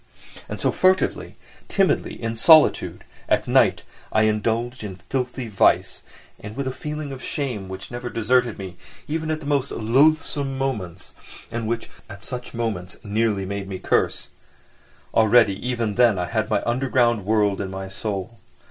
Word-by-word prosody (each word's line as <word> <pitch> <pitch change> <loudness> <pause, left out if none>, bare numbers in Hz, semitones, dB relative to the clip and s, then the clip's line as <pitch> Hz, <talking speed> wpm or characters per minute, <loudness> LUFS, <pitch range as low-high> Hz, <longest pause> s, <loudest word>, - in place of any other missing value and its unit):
And - - -5
so, - - +1
furtively, 185 0 +1 0.3
timidly, 195 -2 +1
in 115 -1 -3
solitude, 155 +6 +5 0.3
at - - +2
night, - - +3 0.3
I 110 - +3
indulged 110 +3 0
in 100 -3 -6
filthy 125 +5 -4
vice, 105 -4 +2 0.5
with 140 +1 -3
a 130 - -1
feeling 150 +2 -5
of 130 -1 -7
shame 120 -10 -3
which 95 +3 -8
never 120 0 -5
deserted 120 0 +1
me, 95 -2 -8 0.3
even 160 +1 -2
at 155 0 -2
the - - -9
most 140 -2 0
loathsome 140 +3 +2
moments, 105 -10 -4 0.4
and 115 -1 -3
which 115 0 -2 0.2
at 100 +1 -10
such 125 +1 -6
moments 105 -6 -3
nearly 105 -2 0
made 100 0 -4
me 95 -1 -5
curse. - - 0 0.8
Already 110 -1 +5
even 120 -4 -1
then 115 -3 +4
I 90 - -1
had 110 +3 -1
my - - +1
underground 120 -3 +1
world 105 -1 +1
in 95 - -4
my 95 0 -6
soul. 100 +2 -5
115 Hz, 155 wpm, -23 LUFS, 100-130 Hz, 0.8 s, solitude